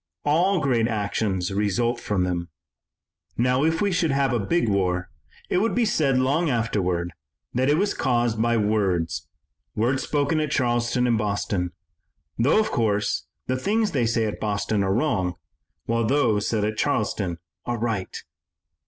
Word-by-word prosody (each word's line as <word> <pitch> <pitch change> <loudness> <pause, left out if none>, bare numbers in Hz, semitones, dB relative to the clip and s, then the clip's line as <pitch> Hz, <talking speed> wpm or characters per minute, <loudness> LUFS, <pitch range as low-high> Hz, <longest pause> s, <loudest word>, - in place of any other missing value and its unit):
All 175 +6 +3
great 125 -6 +2
actions 100 -4 -1
result 110 +4 0
from 100 -3 -1
them. 85 -1 -2 0.9
Now, 125 +3 +2
if 160 +1 +1
we 200 - +1
should 175 -2 +1
have 135 -2 +1
a 120 - +1
big 140 - +1
war, 90 -3 0 0.4
it - - +1
would 225 +4 +1
be 240 -1 +3
said 145 -11 +2
long 140 +6 +2
afterward 95 -8 0 0.4
that 130 +2 +1
it 150 - +4
was 200 +3 +1
caused 120 -3 0
by 120 0 +2
words, 95 -7 0 0.5
words 130 +5 +1
spoken 145 +2 0
at 155 -1 -1
Charleston 120 -2 +1
and 115 -3 +2
Boston, 100 -3 -1 0.7
though, 140 - +4
of 220 - 0
course, 105 -3 0 0.2
the 130 - -1
things 210 - +1
they 125 -6 +1
say 115 0 +1
at 105 - -4
Boston 105 -1 0
are 95 - 0
wrong, 95 - 0 0.5
while 115 0 0
those 115 -4 +2
said 105 -2 0
at 110 0 -2
Charleston 105 - 0 0.3
are 120 -1 -1
right." 110 -5 -3
115 Hz, 160 wpm, -24 LUFS, 100-140 Hz, 0.9 s, it